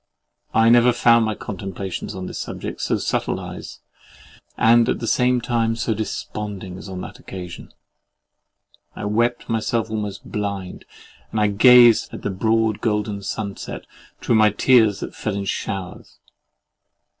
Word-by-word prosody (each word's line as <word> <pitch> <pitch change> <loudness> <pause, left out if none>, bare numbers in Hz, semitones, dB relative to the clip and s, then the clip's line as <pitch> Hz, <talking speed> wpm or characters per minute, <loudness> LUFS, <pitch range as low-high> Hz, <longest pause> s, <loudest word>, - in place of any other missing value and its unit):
I 115 0 +5
never 120 +1 +6
found 115 -1 +4
my 110 -1 -2
contemplations 95 0 -6
on 95 -1 -5
this - - -6
subject - - -6
so - - 0
subtilised - - -4 0.8
and 115 +1 +5
at - - +1
the 115 - -4
same 125 +2 +2
time 115 -1 0
so 115 0 -1
desponding 105 -3 -5
as 100 - -10
on 95 -1 -6
that - - -9
occasion. 90 -2 -9 1.2
I - - -5
wept 120 +3 0
myself 115 0 -1
almost 105 -2 -4
blind, 100 -3 -4 0.4
and 110 - -2
I 105 -1 +3
gazed 120 +2 +6
at - - -9
the 105 - -1
broad 110 +2 +1
golden 105 -2 -1
sunset 100 0 -5 0.3
through - - 0
my 110 -1 +6
tears 110 -1 +3
that - - -6
fell 105 -2 -3
in 100 0 -3
showers. 95 -1 -5
105 Hz, 145 wpm, -21 LUFS, 100-115 Hz, 1.2 s, never